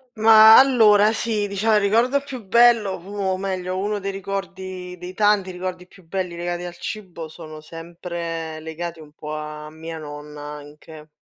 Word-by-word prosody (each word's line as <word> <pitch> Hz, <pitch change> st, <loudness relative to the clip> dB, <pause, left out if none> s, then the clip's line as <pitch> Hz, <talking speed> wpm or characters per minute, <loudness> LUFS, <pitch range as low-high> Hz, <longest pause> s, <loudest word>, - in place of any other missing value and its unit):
Ma 220 Hz, 0 st, +8 dB
allora 220 Hz, -6 st, +5 dB
sì, 220 Hz, -2 st, -1 dB
dicia 205 Hz, +2 st, +1 dB
il -, -, +4 dB
ricordo 230 Hz, +7 st, +2 dB
più 265 Hz, -4 st, -8 dB
bello, 230 Hz, -1 st, +4 dB
pu 180 Hz, -, -14 dB
o 195 Hz, -2 st, -1 dB
meglio 185 Hz, -1 st, -3 dB
uno 205 Hz, +2 st, -1 dB
dei 195 Hz, 0 st, -3 dB
ricordi 190 Hz, -2 st, -6 dB
dei 180 Hz, +1 st, -8 dB
tanti 205 Hz, -2 st, +2 dB
ricordi 180 Hz, 0 st, -6 dB
più 185 Hz, 0 st, -20 dB
belli 180 Hz, -1 st, -3 dB
legati 175 Hz, 0 st, -4 dB
al 175 Hz, 0 st, -7 dB
cibo 180 Hz, -5 st, -7 dB
sono 155 Hz, -1 st, -11 dB
sempre 165 Hz, 0 st, -6 dB
legati 165 Hz, +1 st, -6 dB
un 150 Hz, -1 st, -14 dB
po' 150 Hz, 0 st, -7 dB
a 150 Hz, 0 st, -7 dB
mia 160 Hz, +1 st, -8 dB
nonna 150 Hz, -1 st, -9 dB
anche. 150 Hz, +1 st, -11 dB
185 Hz, 165 wpm, -22 LUFS, 165-205 Hz, -, Ma